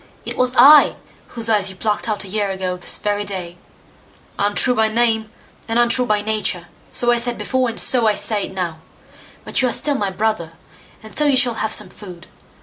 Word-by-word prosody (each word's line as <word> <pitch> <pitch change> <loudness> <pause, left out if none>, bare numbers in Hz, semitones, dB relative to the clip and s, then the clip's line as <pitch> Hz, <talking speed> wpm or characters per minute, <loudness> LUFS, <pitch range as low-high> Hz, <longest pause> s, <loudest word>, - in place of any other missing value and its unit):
"It - - -5
was 255 0 0
I 285 +4 +7 0.3
whose 230 -1 -1
eyes 210 -3 +1
you 190 - -10
plucked 210 +3 -2
out 210 -1 -2
a - - -10
year 205 +1 -2
ago 190 -1 -3
this 180 - 0
very 205 0 -2
day. 180 -4 -6 0.8
Untrue 205 +5 +2
by 220 -2 +2
name, 220 -1 -1 0.4
and 225 0 -1
untrue 240 +1 +2
by 210 -1 +1
nature; 210 -5 -2 0.2
so 240 0 +1
I 240 - +2
said 240 0 0
before, 260 -2 -1
and 230 - -1
so 240 -3 +4
I 210 - +2
say 210 -2 0
now; 180 -4 -5 0.7
but - - +1
you 255 - +1
are - - -2
still 290 - +2
my 205 -8 -2
brother, 190 -4 -3 0.5
and 220 - -13
so 300 - +1
you 280 -2 +3
shall 250 -2 +3
have 220 - -2
some - - -1
food. 180 -4 -12
220 Hz, 205 wpm, -18 LUFS, 195-240 Hz, 0.8 s, I